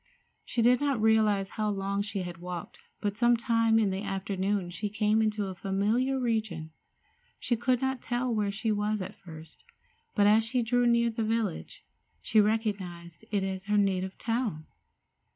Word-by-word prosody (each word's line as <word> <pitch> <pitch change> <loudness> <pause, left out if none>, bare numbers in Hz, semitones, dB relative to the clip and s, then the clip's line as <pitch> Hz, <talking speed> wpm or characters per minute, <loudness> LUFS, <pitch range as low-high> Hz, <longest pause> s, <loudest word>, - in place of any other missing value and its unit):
She 235 - -1
did 250 +3 +4
not 280 -4 +1
realize 215 -3 +3
how 215 0 -2
long 200 0 -1
she 205 -2 -3
had 175 -1 -7
walked, 180 0 -7 0.2
but 205 -1 -1
some 240 0 +4
time 230 -2 +2
in 210 -3 +2
the 190 +1 -3
afternoon 195 -1 -2
she 205 +4 -4
came 210 +1 +2
into 215 -1 0
a 190 - -5
familiar 210 +9 0
region. 220 -10 -2 0.7
She 240 - 0
could 250 +2 0
not 265 -1 -1
tell 245 0 -1
where 210 -2 0
she 215 +2 -1
was 210 +1 0
at - - -7
first, 160 -4 -12 0.5
but 205 - +4
as 215 +2 +5
she 240 +2 0
drew 245 +1 +2
near 235 0 +3
to 225 - -18
the 225 - +1
village 220 -4 -2 0.3
she 215 - +3
recognized 195 -6 -2
it 205 -2 0
as 190 0 -4
her 210 +1 +1
native 190 -2 0
town. 225 -9 -2
210 Hz, 175 wpm, -29 LUFS, 195-230 Hz, 0.7 s, as